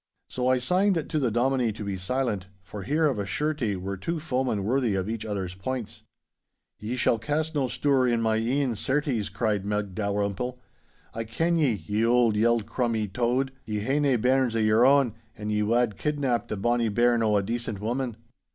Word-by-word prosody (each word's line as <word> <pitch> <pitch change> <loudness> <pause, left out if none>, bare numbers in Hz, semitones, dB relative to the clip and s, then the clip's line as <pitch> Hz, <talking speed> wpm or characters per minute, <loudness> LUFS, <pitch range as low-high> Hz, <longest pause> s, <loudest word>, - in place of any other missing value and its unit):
So 125 0 -2
I 130 0 +4
signed 180 +5 +1
to 155 - 0
the 130 -4 +1
Dominie 120 +1 +1
to 105 - -7
be 100 -1 -3
silent, 100 0 -2 0.2
for 100 +2 -8
here 150 +9 +1
of 135 -8 +1
a 100 - -2
surety 140 -3 -1
were 95 +1 -4
two 165 - -3
foemen 130 - -1
worthy 120 -1 +1
of 95 0 -1
each 110 0 -4
other's 95 -4 -3
points. 115 +4 -5 0.8
'Ye 110 +4 -3
shall 120 -2 +2
cast 155 +6 -1
no 140 -4 +1
stour 135 0 +2
in 120 -1 +2
my 110 -1 +1
e'en, 125 +2 0
certes,' 130 -2 -1
cried 105 -4 -1
Meg 105 -1 -2
Dalrymple. 100 +4 -2 0.5
'I 115 - -3
ken 165 +10 0
ye, 140 -7 +3
ye 105 +3 0
auld 120 -2 +3
yeld 115 0 +2
crummie 115 -5 -1
Tode. 125 +2 +1
Ye 105 -1 -3
hae 135 +7 +1
nae 140 -3 +3
bairns 125 0 +2
o' - - +1
your 110 +3 +4
ain, 135 -5 +4 0.2
and 105 0 -4
ye 105 0 +1
wad 115 0 +1
kidnap 135 -6 -1
the 110 - -3
bonny 120 +2 +1
bairn 120 +2 +3
o' 105 -2 +3
a 100 - +1
decent 115 -1 -3
woman. 120 +2 -2
120 Hz, 195 wpm, -26 LUFS, 105-130 Hz, 0.8 s, I